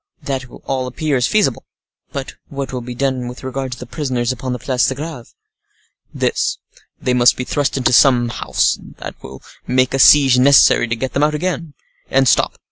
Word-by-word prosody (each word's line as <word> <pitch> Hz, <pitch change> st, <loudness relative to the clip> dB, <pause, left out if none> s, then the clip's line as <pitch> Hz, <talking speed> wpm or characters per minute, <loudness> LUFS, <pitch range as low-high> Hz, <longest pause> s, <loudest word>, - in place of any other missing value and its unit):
"That 135 Hz, -2 st, -3 dB
all 130 Hz, 0 st, -4 dB
appears 135 Hz, -1 st, -1 dB
feasible. 200 Hz, -, +1 dB, 0.5 s
But 140 Hz, 0 st, -6 dB, 0.2 s
what 140 Hz, -1 st, -5 dB
will 125 Hz, -, -3 dB
be 120 Hz, +1 st, -8 dB
done 130 Hz, -1 st, -1 dB
with 125 Hz, +1 st, -9 dB
regard 130 Hz, 0 st, -4 dB
to -, -, -9 dB
the 125 Hz, -, -9 dB
prisoners 125 Hz, -2 st, -2 dB
upon 130 Hz, 0 st, -5 dB
the 125 Hz, -, -2 dB
Place 125 Hz, 0 st, 0 dB
de 130 Hz, -, -2 dB
Greve?" 150 Hz, -4 st, -8 dB, 0.8 s
"This: -, -, -1 dB, 0.4 s
they 125 Hz, -, -1 dB
must 125 Hz, -1 st, +4 dB
be 125 Hz, -, -3 dB
thrust 140 Hz, +2 st, -1 dB
into 125 Hz, -1 st, +1 dB
some 120 Hz, -1 st, +4 dB
house—that 115 Hz, -, -3 dB
will 65 Hz, 0 st, -11 dB, 0.2 s
make 130 Hz, 0 st, +1 dB
a 135 Hz, -, 0 dB
siege 135 Hz, -2 st, +6 dB
necessary 135 Hz, -2 st, +5 dB
to 115 Hz, -, -1 dB
get 130 Hz, +3 st, -4 dB
them 140 Hz, -, 0 dB
out 150 Hz, +1 st, +2 dB
again. 165 Hz, -2 st, -3 dB, 0.3 s
And 135 Hz, 0 st, +2 dB
stop! -, -, +2 dB
130 Hz, 185 wpm, -18 LUFS, 125-140 Hz, 0.8 s, siege